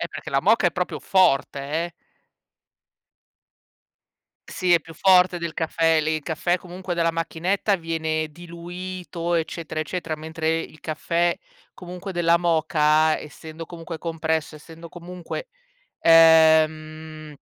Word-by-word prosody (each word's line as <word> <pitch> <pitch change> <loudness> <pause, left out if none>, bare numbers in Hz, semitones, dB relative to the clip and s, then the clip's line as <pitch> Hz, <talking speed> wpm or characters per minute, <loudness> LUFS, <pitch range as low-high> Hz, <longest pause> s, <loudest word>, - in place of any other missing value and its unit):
Eh, - - -2
perché - - -8
la - - +2
moka - - +3
è - - +3
proprio - - -3
forte, 145 -8 +2 0.3
eh. 175 - -8 2.5
Sì, 180 -3 0
è 170 - +5
più 165 +1 -14
forte 180 +1 +4
del 170 -1 -4
caffè, 165 0 +1
lì. 155 +1 0
Il 155 - -4
caffè, 175 +3 -1
comunque, 180 0 -7
della 165 -1 +1
macchinetta 175 +5 -1
viene 160 -2 -2
diluito, 175 +1 -6
eccetera, 160 -1 -3
eccetera, 165 0 -3
mentre, 160 +1 -2
il 155 -1 -9
caffè, 170 +2 0 0.4
comunque, 180 +2 -8
della 170 -1 +3
moka, 155 -2 +2
essendo 160 +2 -10
comunque 165 -1 -8
compresso, 160 -2 -2
essendo 165 +2 -12
comunque 180 - -8 0.5
ehm, 160 -1 +4
165 Hz, 125 wpm, -23 LUFS, 160-175 Hz, 2.5 s, è